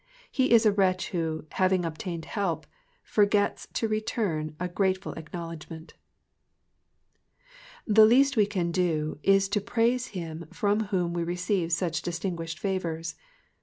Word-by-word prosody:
He 260 -1 +2
is 230 -1 +6
a 215 - +6
wretch 190 -2 +1
who, 160 -4 -2
having 185 -1 +2
obtained 165 0 -5
help, 175 -7 -2 0.4
forgets 205 -1 +1
to 225 - 0
return 205 -8 -2
a 180 - -1
grateful 190 +1 -1
acknowledgment. 165 0 -8 1.9
The 215 0 +7
least 275 +4 +4
we 210 -3 +4
can 180 -5 -1
do 160 -4 0
is 195 +2 +4
to 205 +1 0
praise 235 +3 +1
him 165 -2 -6
from 210 -1 +1
whom 180 -4 -1
we 170 -1 -1
receive 180 0 -1
such 170 0 0
distinguished 170 -2 -4
favours. 170 -4 -2
185 Hz, 130 wpm, -27 LUFS, 165-205 Hz, 1.9 s, The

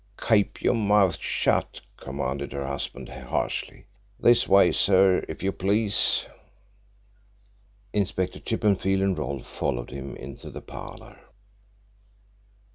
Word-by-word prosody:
"Keep 105 -3 +2
your - - +3
mouth 105 -6 +3
shut," - - 0
commanded 70 +2 -4
her 70 -1 -3
husband 70 +1 -4
harshly. 60 -1 -4 0.3
"This 120 0 +4
way, 95 -2 +6
sir, 95 -1 +4
if 80 - -7
you 95 - +1
please." 100 +3 +1 1.7
Inspector 95 -3 -1
Chippenfield 95 -2 +1
and 95 -1 +1
Rolfe 70 -4 -4
followed 65 -4 -3
him 70 0 -7
into 65 0 -9
the - - -8
parlour. - - -10
95 Hz, 110 wpm, -26 LUFS, 70-100 Hz, 1.7 s, way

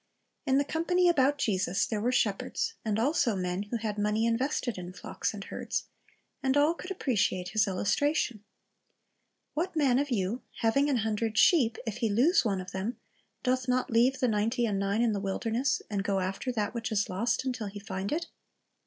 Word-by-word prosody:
In 265 0 +4
the 285 - +2
company 355 +4 +2
about 285 -4 +3
Jesus 195 -6 +1
there 215 -2 -2
were 245 +3 +1
shepherds, 245 - 0
and 215 -2 0
also 245 -2 +2
men 180 0 -2
who 235 - -1
had 215 -2 -3
money 210 +2 +1
invested 240 -2 0
in 180 0 -7
flocks - - -3
and 205 -2 -7
herds, - - -3 0.6
and 265 +1 +2
all 295 +3 +4
could 360 +2 -9
appreciate 205 - 0
His 215 0 +2
illustration: 215 +4 0 1.1
"What 330 +3 -2
man 270 -5 +3
of 285 0 -1
yon, 220 0 -1 0.2
having 275 +6 +3
an 270 - +2
hundred 220 0 -1
sheep, 245 -10 +5
if 225 -1 -3
he 230 -2 0
lose 260 - +4
one 200 -5 0
of 185 +1 -9
them, 195 +5 -3 0.5
doth 255 0 0
not 250 0 +1
leav^e 245 +4 +4
the 250 - +1
ninety 225 +3 +1
and 205 -3 0
nine 200 +3 +1
in 235 - +3
the 200 - -1
wilderness, 225 +6 -1
and 200 -2 -2
go 195 -1 0
after 190 +7 -2
that 215 -3 -2
which 230 -1 -3
is 205 -2 +1
lost, 225 +7 -1
until 245 -5 -2
he 200 +1 -7
find 195 -1 -4
it?" 335 +2 -1
225 Hz, 190 wpm, -29 LUFS, 205-265 Hz, 1.1 s, sheep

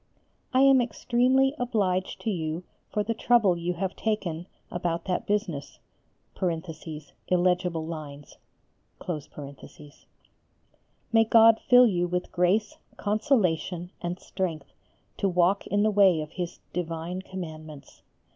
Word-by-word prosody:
I 260 - +3
am 270 -1 +6
extremely 255 +2 +2
obliged 200 -7 -1
to 225 - -1
you 160 -1 -3 0.3
for 210 - 0
the 230 - -1
trouble 225 -5 +3
you 175 +1 -2
have 190 +2 -3
taken 180 -6 -2 0.2
about 175 -1 -2
that 180 -2 -2
business 200 -9 -2 1.5
(illegible 180 -2 +1
lines).... 150 -3 -8 2.8
May 225 0 +6
God 225 0 +6
fill 250 0 +8
you 175 -6 +1
with 180 +1 -3
grace, 185 +4 +1 0.2
consolation, 185 - 0
and 175 +1 -4
strength 165 -7 -4 0.4
to 195 - +1
walk 180 +2 +2
in 205 +2 +1
the 215 - +3
way 195 -5 +5
of 155 0 -7
His 175 -1 -5 0.2
divine 170 +1 -3
commandments! 155 -6 -9
185 Hz, 115 wpm, -27 LUFS, 170-215 Hz, 2.8 s, fill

